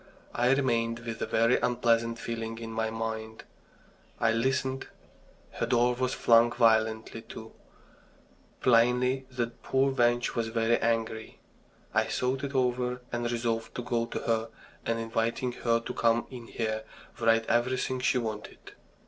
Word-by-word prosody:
I 120 +1 +2
remained 115 -4 +1
with 115 -1 -6
a - - -1
very 115 +2 +3
unpleasant 115 -1 +1
feeling 115 -1 -4
in 115 -1 -6
my 110 0 -1
mind. 110 0 -5 0.8
I 115 - +3
listened. 130 +3 0 0.6
Her - - -2
door 120 0 +3
was 130 +1 -1
flung 115 0 +5
violently 110 -1 +2
to 110 0 -9 1.1
plainly 125 +2 +3
the 125 -2 -1 0.2
poor 135 +1 +2
wench 120 -2 +2
was 115 -1 -1
very 115 +1 +1
angry... 115 -1 -1 0.6
I - - +3
thought 130 +1 -1
it 140 0 -4
over, 125 -1 0
and 120 0 -1
resolved 115 -1 -2
to 125 - -3
go 115 -1 -1
to - - -4
her, 115 0 0 0.4
and, 115 - +1
inviting 115 +2 -1
her 115 -1 +1
to - - -5
come 115 0 +2
in 120 -3 -9
here, 110 -1 -2 0.4
write 115 -1 +3
everything 125 +2 0
she 130 - +2
wanted. 110 -3 -5
115 Hz, 145 wpm, -29 LUFS, 115-125 Hz, 1.1 s, flung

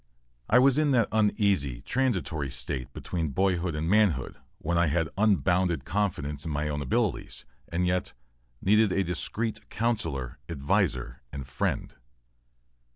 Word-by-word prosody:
I 115 - +6
was 135 +2 +5
in 155 -1 +3
that 115 - +3
uneasy, 100 - +2
transitory 95 - 0
state 65 0 -4
between 85 +4 -3
boyhood 90 +1 +1
and 75 +2 -2
manhood 95 - +2 0.2
when 85 - -2
I 85 0 +4
had 80 +2 +1
unbounded 90 -7 +2
confidence 75 -7 -1
in 80 - -4
my 75 0 -1
own 75 -1 -2
abilities, 65 - -1 0.2
and 90 +2 0
yet 90 0 0 0.5
needed 105 +1 +4
a 95 - +2
discreet 95 +6 -3
counsellor, 80 - -2
adviser 65 -5 0
and 70 -2 -6
friend. 65 - -2
85 Hz, 135 wpm, -28 LUFS, 70-105 Hz, 0.5 s, I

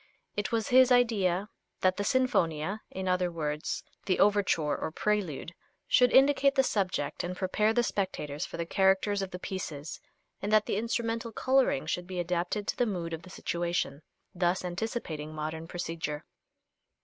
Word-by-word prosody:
It 205 -2 -2
was 225 -2 0
his 255 0 +6
idea 210 -6 +3 0.3
that 185 0 +3
the 205 - -1
Sinfonia, 195 -7 +1
in 190 0 -5
other 180 -1 +1
words 150 -2 -3 0.2
the 185 - +2
Overture 195 -7 +3
or - - -3
Prelude, 180 -5 -1 0.3
should 250 -1 +5
indicate 275 +1 +5
the 265 - +5
subject 185 - -1
and 180 +1 -4
prepare 210 +3 +1
the 240 +1 +2
spectators 175 -8 -2
for - - -6
the 170 - -2
characters 195 +3 +2
of 195 - -3
the 180 - -6
pieces, 165 -6 -5 0.4
and 205 - -2
that 215 -1 +5
the - - -1
instrumental 230 +1 -1
coloring 260 - +2
should 175 +2 -2
be 185 -1 -4
adapted 180 +4 -1
to - - 0
the 245 - +2
mood 170 -5 -3
of 165 - -4
the 185 - -13
situation, 170 -5 -2 0.3
thus 180 +1 0
anticipating 175 -5 -4
modern 155 +1 -4
procedure. 165 -4 -4
185 Hz, 160 wpm, -30 LUFS, 170-215 Hz, 0.4 s, his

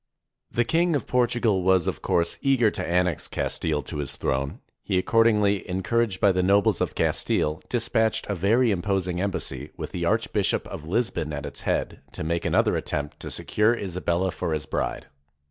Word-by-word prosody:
The 120 - +1
King 165 +4 +2
of 140 - -1
Portugal 120 -5 +2
was, 95 -1 +3
of - - -3
course, 85 0 0
eager 130 -6 +3
to 95 - -4
annex 90 -1 0
Castfle 75 -3 -2
to - - -5
his 75 -1 -4
throne. 70 +1 -2 0.2
He 95 - -1
accordingly, 105 -1 +3
encouraged 95 +2 0
by 100 - +5
the 90 0 +1
nobles 100 +2 +3
of - - -1
Castile, 75 +4 0
dispatched 115 -2 +1
a 100 - -1
very 110 +6 +3
imposing 95 -2 -1
em 100 - +1
bassy, 70 -6 -4
with - - -5
the - - -2
Archbishop - - +1
of 75 - -8
Lisbon 90 -6 0
at 70 -1 -4
its - - -6
head, - - -1
to - - -5
make 85 +2 -1
another - - +2
attempt 75 0 -3
to - - -6
secure 110 +3 +1
Isabella 90 -2 -1
for 80 - -3
his 75 0 -2
bride. 80 - -3
95 Hz, 180 wpm, -25 LUFS, 85-115 Hz, 0.2 s, by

